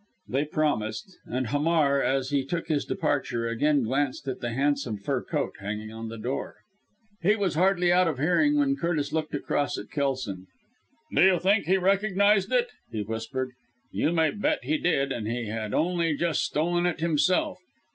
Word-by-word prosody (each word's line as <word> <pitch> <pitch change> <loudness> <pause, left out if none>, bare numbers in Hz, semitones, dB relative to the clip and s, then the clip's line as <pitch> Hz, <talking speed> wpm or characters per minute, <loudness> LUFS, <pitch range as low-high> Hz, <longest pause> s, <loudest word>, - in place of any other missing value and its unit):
They 135 +4 0
promised; 150 - -2
and 125 -1 -2
Hamar, 145 -1 +2
as 135 0 0
he 140 -2 +2
took 165 +4 -4
his 150 -3 +1
departure, 130 -6 -1
again 140 +4 +2
glanced 135 +3 -1
at 130 -1 -3
the 120 - -3
handsome 135 -2 0
fur 100 - -2
coat - - -2
hanging 105 +2 -5
on 115 0 -6
the 115 - -7
door. 125 +5 -4 0.7
He 200 +5 +4
was 200 -5 0
hardly 180 +1 +3
out 180 0 +4
of 155 -5 -1
hearing 180 - +3
when 280 -1 +2
Curtis 155 -4 -1
looked 155 -2 -2
across 145 0 -1
at - - -8
Kelson. 130 - -2 0.7
"Do - - +3
you 190 -1 +6
think 200 0 +2
he 190 +2 +4
recognised 195 +1 +2
it!" - - +2 0.2
he 110 -2 -2
whispered. 115 +5 -4 0.4
"You 155 - +1
may 160 -2 +2
bet 295 +9 -1
he 310 -1 0
did, 140 - +1
and 110 -3 -3
he 115 -1 -3
had 110 -1 -4
only 165 -1 +1
just 170 -2 +1
stolen 175 +3 +1
it 175 - -2
himself! 170 +3 +1
150 Hz, 175 wpm, -27 LUFS, 125-175 Hz, 0.7 s, you